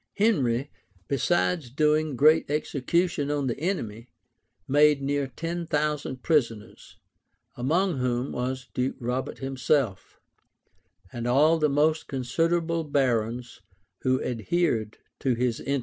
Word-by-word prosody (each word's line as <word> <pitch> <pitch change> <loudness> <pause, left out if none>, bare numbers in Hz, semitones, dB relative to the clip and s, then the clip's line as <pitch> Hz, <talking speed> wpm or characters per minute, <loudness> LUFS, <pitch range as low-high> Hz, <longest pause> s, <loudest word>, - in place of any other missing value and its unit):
Henry, 140 - +1 0.4
besides 160 +1 0
doing 150 +2 +1
great 155 +4 +4
execution 150 +1 0
on 145 -1 0
the 125 0 -2
enemy, 120 - -3 0.6
made 145 +1 +4
near 140 0 -1
ten 165 +5 -5
thousand 150 -4 -1
prisoners; 115 -9 -1 0.6
among 160 +5 0
whom 125 +1 -1
was 130 0 -3
Duke 125 +1 -1
Robert 125 +1 -3
himself, 135 -5 -1 0.9
and 120 0 -4
all 150 +6 +4
the 155 -1 +2
most 155 +3 +1
considerable 165 +6 0
barons, 125 -5 -1 0.4
who 130 0 +2
adhered 115 - -1 0.2
to 130 -3 +1
his 120 -1 -1
interests. 140 0 -1
140 Hz, 115 wpm, -26 LUFS, 125-155 Hz, 0.9 s, great